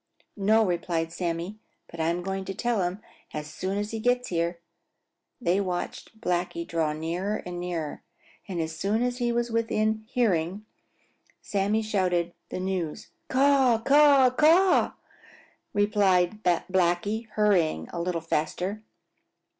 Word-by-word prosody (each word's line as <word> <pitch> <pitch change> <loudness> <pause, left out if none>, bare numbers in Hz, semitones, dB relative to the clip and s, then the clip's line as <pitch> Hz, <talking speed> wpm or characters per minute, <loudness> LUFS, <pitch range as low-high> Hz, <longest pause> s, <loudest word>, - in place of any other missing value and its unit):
"No," 215 +2 +3
replied 170 -2 -1
Sammy, 175 +4 -3 0.3
"but 170 - -11
I'm 170 +2 0
going 195 +1 -3
to 195 - -5
tell 235 -2 0
him 180 +3 -2 0.3
as 150 0 -3
soon 190 +4 -3
as 205 +1 -2
he 225 - -3
gets 245 +2 +1
here." 170 0 -1 0.8
They 195 -4 +1
watched 185 +4 -4
Blacky 175 -4 -1
draw 160 -2 0
nearer 175 +7 -3
and 175 -1 -5
nearer, 170 -4 -4 0.5
and 185 -4 -4
as 160 0 -3
soon 205 +7 0
as 250 0 -1
he 240 -1 +1
was 235 0 -1
within 220 -1 0
hearing 205 -6 0 0.7
Sammy 205 +2 0
shouted 180 -5 0 0.2
the - - -4
news. 185 -4 -3 0.2
"Caw, 265 -3 +4
caw, 280 -2 +6
caw," 335 +8 +4 0.8
replied 205 -1 +2
Blacky, 185 +4 +1
hurrying 180 - +2
a 170 - -2
little 170 -1 -2
faster. 180 +6 -2
195 Hz, 130 wpm, -27 LUFS, 175-220 Hz, 0.8 s, caw